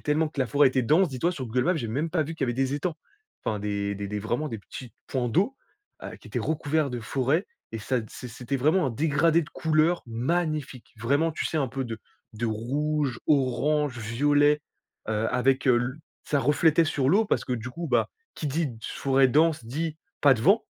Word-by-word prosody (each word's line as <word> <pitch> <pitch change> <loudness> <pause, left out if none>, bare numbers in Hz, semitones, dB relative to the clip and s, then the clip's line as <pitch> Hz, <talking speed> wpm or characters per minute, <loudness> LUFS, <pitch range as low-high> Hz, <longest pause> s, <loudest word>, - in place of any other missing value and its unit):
tellement 155 +1 +1
que 150 - -15
la 130 - +2
forêt 145 0 +4
était 130 0 0
dense 160 +9 +4
dis-toi 145 +7 -1
sur 135 -8 -5
Google 125 +3 0
Maps 180 -1 +2
j'avais 115 -6 -3
même 155 +6 -1
pas 165 -2 +1
vu 160 +2 -5
qu'il 145 - -1
y 125 - -3
avait - - +1
des 135 +1 0
étangs. 160 +3 -2 0.5
Enfin 105 - -1
des 100 0 -2
des 100 0 -4
des 105 0 -3
vraiment 120 +8 -2
des 115 - -5
petits 120 +4 -10 0.2
points 125 -2 -1
d'eau, 200 - +1 0.5
heu, - - -7
qui - - -15
étaient - - -2
recouverts 155 -1 0
de 120 - -4
forêts 135 - 0 0.3
et 115 - -3
ça 125 +3 -1
t 110 - -9
c'é 125 - -8
c'était 125 +4 -4
vraiment 155 +5 +2
un - - -1
dégradé 155 +5 +2
de 150 - -11
couleurs 160 +2 +1
magnifiques 140 +2 -2
vraiment 140 +9 +1
tu - - -3
sais 160 - -2
un 140 - +1
peu 135 +2 -3
de 115 -2 -5 0.4
de 120 +2 -2
rouge, 135 +4 -1
orange, 145 0 +2
violet, 145 +6 +2 0.5
heu, 110 0 0
avec, 130 +2 +2
heu, 120 - +6
l 120 +1 -2 0.3
ça 145 -2 +1
reflétait 155 +4 +3
sur 140 -4 0
l'eau 215 +7 +4
parce - - 0
que 125 - -3
du 120 +1 -4
coup, 170 +5 -5
bah, 120 -3 +2 0.3
qui 150 - -3
dit: 155 +4 0
«d 115 - -10
forêt 135 +2 +2
dense» 155 -1 +3
dit: 155 +6 -3 0.2
«pas 140 -2 +6
de 110 - -5
vent» 200 - +4
140 Hz, 220 wpm, -26 LUFS, 120-155 Hz, 0.5 s, heu